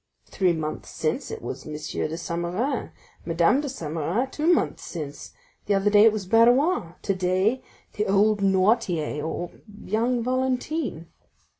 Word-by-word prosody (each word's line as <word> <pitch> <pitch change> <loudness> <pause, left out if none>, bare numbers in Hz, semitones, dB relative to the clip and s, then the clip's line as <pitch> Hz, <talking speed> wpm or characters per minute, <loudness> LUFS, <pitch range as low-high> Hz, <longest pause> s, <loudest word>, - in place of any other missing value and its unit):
Three 185 -3 +1
months 155 -1 -4
since 155 -1 -2
it - - -7
was 130 +4 -6
M. 155 - -6
de 150 +1 -3
Saint 170 0 -3
Méran; 230 +10 -2 0.3
Madame 170 - +2
de 290 - -4
Saint 165 - -6
Méran 180 - -1
two 315 +3 +2
months 345 - +1
since; 150 -4 -7 0.4
the 200 - +3
other 195 +1 +2
day 205 +1 +7
it 225 - +7
was 210 -3 -4
Barrois; 230 - +3
today, 190 +5 +1 0.3
the 210 - -1
old 205 +1 +3
Noirtier, 190 -6 +1
or 170 +2 -4 0.3
young 235 +4 0
Valentine." 255 - -1
195 Hz, 150 wpm, -25 LUFS, 165-240 Hz, 0.4 s, day